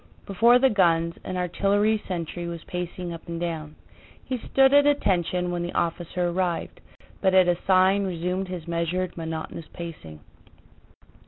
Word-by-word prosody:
Before 230 +5 +5
the 265 +1 +3
guns 170 -4 +2
an 185 - -4
artillery 205 +4 +1
sentry 175 -1 -4
was 170 -2 -6
pacing 180 0 -5
up 165 - -10
and 170 0 -4
down; 160 -3 -4 0.5
he 255 -2 -3
stood 270 +3 +3
at 285 0 +6
attention 180 - +1
when 175 0 -2
the 175 0 -4
officer 175 +1 -1
arrived, 175 -1 -2 0.4
but 190 -1 +3
at 185 -1 +6
a 175 - +3
sign 190 +1 +4
resumed 180 +1 -2
his 180 -3 -7
measured, 170 +2 -2
monotonous 160 -1 -6
pacing. 120 - -9
180 Hz, 150 wpm, -25 LUFS, 170-190 Hz, 0.5 s, at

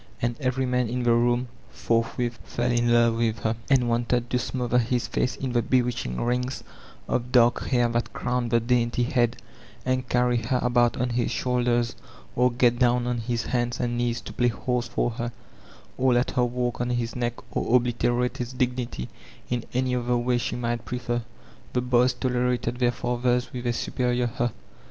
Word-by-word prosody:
And 120 0 -1
every 130 -1 0
man 125 -2 0
in 125 +1 -2
the 120 -1 +4
room 120 +1 +2 0.2
fortii 115 0 0
with 120 -2 -1
fell 120 +1 -1
in 120 0 +2
love 115 -1 +4
with 115 -1 +1
her, 110 0 0
and 130 -3 +4
wanted 120 +1 0
to 125 - +2
smodier 125 -1 0
his 120 +1 0
face 125 - -1
in 130 -2 -3
the 120 -1 +2
bewitching 120 - 0
rings 125 +2 -1 0.4
of 125 0 -1
dark 120 -1 +4
hair 120 -2 +3
that 120 0 -1
u - - -6
own 125 0 +1
e - - -5
d 115 - +4
the - - +3
dainty 120 0 +1
head, 120 -1 +1 0.5
and 130 -1 -1
carry 125 0 +2
her 115 +2 0
about 120 -1 +3
on 125 0 0
his 120 +1 0
shoulders, 120 -1 +1 0.4
or 125 +1 +4
get 120 0 +2
down 125 -1 +3
on 125 -1 -1
his 115 0 -2
hands 120 0 -1
and 120 0 -1
knees 120 -1 0
to - - -9
play 120 - +2
horse 120 +1 -1
for 120 - 0
her, 120 +1 -4 0.7
or 130 -1 +4
let 120 +1 +2
her 125 -2 +2
walk 120 0 -2
on 120 - -1
his 120 -1 -1
neck, 120 -1 -1 0.2
or 120 - +2
obliterate 120 0 +1
his 125 0 -4
dignity 125 - -2 0.4
in 120 -2 0
any 125 0 +1
other 120 0 +1
way 120 0 +1
she - - -2
might 120 -1 -2
prefer. 120 -1 -2 0.5
The 125 - +1
boys 125 0 +3
tolerated 125 -1 0
their 120 -1 +3
fathers 125 +1 -1
with 125 -1 -4
a 120 - +1
superior 125 +1 0
''huh 120 0 +1
120 Hz, 195 wpm, -26 LUFS, 120-125 Hz, 0.7 s, the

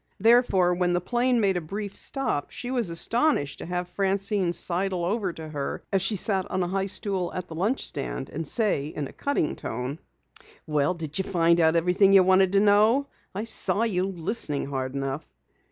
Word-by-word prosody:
Therefore, 210 -5 +4
when 175 0 0
the 175 - +2
plane 245 +6 +1
made 195 -4 +2
a - - -2
brief 200 +5 -6
stop, 270 - -1
she 245 - -6
was 240 -7 +1
astonished 170 - +1
to - - -7
have 180 0 -3
Francine 195 0 0
sidle 180 0 -1
over 200 0 -1
to 160 -1 -8
her 145 -2 -4
as 195 - +3
she 195 +3 +1
sat 190 -1 0
on 185 0 -1
a - - -2
high 195 +2 -1
stool 190 -3 -2
at 180 0 -4
the - - -9
lunch 200 +11 -1
stand, 135 -1 -4
and 160 0 -5
say 200 -10 0
in 150 -2 -5
a - - -14
cutting 280 - -1
tone: 125 +6 -5 0.7
"Well, 150 +3 0
did 160 0 -4
you - - +1
find 170 -2 +2
out 160 0 +4
everything 180 +4 +3
you 195 -1 +7
wanted 190 0 +4
to 200 - +5
know? 215 +7 +4 0.3
I 205 - -2
saw 225 -1 +1
you 190 -5 0
listening 175 -4 -2
hard 135 -1 -4
enough." 135 +2 -4
185 Hz, 195 wpm, -26 LUFS, 165-205 Hz, 0.7 s, you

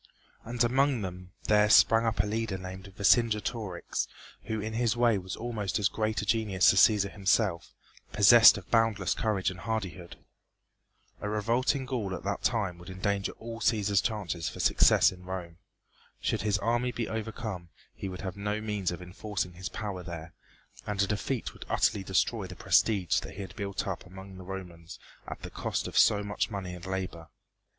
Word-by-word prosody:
And 120 +1 -1
among 130 -1 +2
them 90 -1 -7
there 105 0 +4
sprang 115 +1 +6
up 115 - +2
a - - -3
leader 110 -2 -2
named 95 +1 -8
Vercingetorix, 105 -3 +1 0.4
who 110 0 -2
in 110 +2 -4
his 115 0 +1
way 120 -4 +3
was 95 0 -6
almost 110 -5 -3
as 100 -3 +2
great 110 -3 -1
a - - -4
genius 105 -5 +3
as 95 - +4
Cæsar 100 -2 +4
himself, 100 -3 0 0.4
possessed 110 +2 +8
of 95 - -11
boundless 115 -5 +2
courage 100 -4 0
and 90 - -10
hardihood. 95 -4 -4 1.0
A 105 - -3
revolt 115 +6 +1
in 135 -2 -3
Gaul 115 -8 -3
at - - -8
that 100 +1 -2
time 95 -7 0
would 85 - -11
endanger 100 +1 -2
all 115 0 -8
Cæsar's 105 -4 +2
chances 100 -7 -2
for - - -10
success - - +5
in 90 -1 -12
Rome. 90 -3 -6 0.6
Should - - -1
his 105 0 +1
army 120 +3 0
be 120 -2 -3
overcome 110 -5 -5 0.2
he 95 - -6
would 90 0 -7
have 95 -3 -5
no 105 +1 -2
means 105 -4 -2
of 85 +1 -5
enforcing 95 +1 -4
his 90 0 -6
power 100 -4 -5
there, 85 -1 -8 0.5
and 105 -1 -3
a 100 - +4
defeat 105 +5 -2
would - - -11
utterly 100 - +1
destroy 95 -1 0
the - - -9
prestige 100 -6 +2
that - - -9
he 100 - -6
had 95 -2 -8
built 100 -2 -3
up 95 -2 -5
among 95 +1 -11
the 95 - -9
Romans 90 -3 -8 0.3
at - - -8
the - - -7
cost - - -3
of - - -8
so 105 -1 +5
much 100 +2 -2
money 95 -4 -5
and 90 0 -9
labor. 90 -3 -4
100 Hz, 185 wpm, -29 LUFS, 95-110 Hz, 1.0 s, possessed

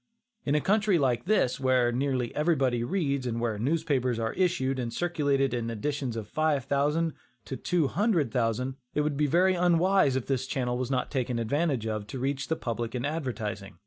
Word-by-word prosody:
In 145 - +1
a 150 - +2
country 210 0 +3
like 125 -5 +1
this, 175 - +2
where 130 -2 +3
nearly 130 -1 -1
everybody 135 -7 +1
reads, 140 -4 -1
and 115 -1 -2
where 115 -3 -1
newspapers 135 -2 0
are 115 -1 -2
issued 155 -8 0
and 120 -2 -3
circulated 145 -6 0
in 115 -1 -2
editions 130 +2 -3
of 110 -2 -5
five 155 -3 +1
thousand 150 +4 +1 0.3
to 135 - -5
two 170 +1 0
hundred 175 - +1
thousand, 125 +2 -1 0.2
it 150 - +2
would 150 -1 -1
be 150 +1 +1
very 180 +6 +4
unwise 175 -3 +3
if 130 - -1
this 130 -1 -1
channel 125 -3 -1
was 125 0 -2
not 130 -2 -1
taken 125 -3 -1
advantage 135 +1 0
of 110 -2 -3
to 130 - -6
reach 135 +2 -2
the 160 - 0
public 115 -3 -4
in 125 - -2
advertising. 110 - -4
135 Hz, 190 wpm, -28 LUFS, 120-155 Hz, 0.3 s, very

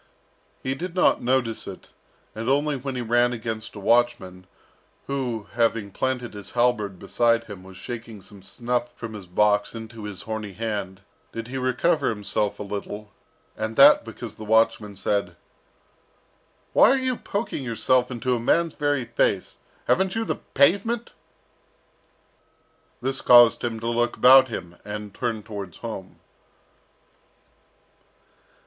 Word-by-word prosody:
He 130 - -1
did 175 +5 -6
not 185 - +3
notice 120 -2 0
it, - - -10 0.4
and 110 +2 -4
only 145 +2 +2
when 135 0 -5
he 125 - -2
ran 120 +1 +2
against 110 -1 -5
a - - -7
watchman, 95 -5 +1 0.6
who, 125 -6 -3
having 115 -3 +1
planted 125 +1 -2
his 105 -2 -9
halberd 110 -6 +1
beside 115 +5 +1
him, 100 -5 -10
was 95 0 -13
shaking 115 0 -7
some 95 +1 -14
snuff 120 +5 -3
from 115 -2 -7
his 100 -4 -9
box 105 +4 +2
into 110 -1 -8
his 100 -3 -7
horny 110 -2 -5
hand, 100 -3 -4 0.3
did 115 +1 -6
he 135 - -4
recover 135 +4 +1
himself 105 -1 -2
a - - -5
little, 105 +1 -6 0.4
and 110 +1 -4
that 140 +4 +8
because 115 -1 -8
the 110 - -10
watchman 110 -1 +2
said, 100 -2 -1 1.4
"Why - - +7
are 270 - +4
you 260 -1 -1
poking 200 - -4
yourself 125 +1 +1
into 125 0 -1
a - - -2
man's 165 +7 +2
very 145 -4 0
face? 115 - 0 0.3
Haven't 190 +1 +2
you 225 0 -1
the - - -2 0.2
pavement?" 200 - +2 1.9
This 135 +1 -2
caused 120 -2 +7
him 115 -2 -2
to 115 - -4
look 120 0 0
about 130 +1 +8
him, 85 -7 -7
and 105 -1 -6
turn 115 -4 -3
towards 100 -5 -7
home. 110 -5 -8
115 Hz, 140 wpm, -24 LUFS, 105-130 Hz, 1.9 s, that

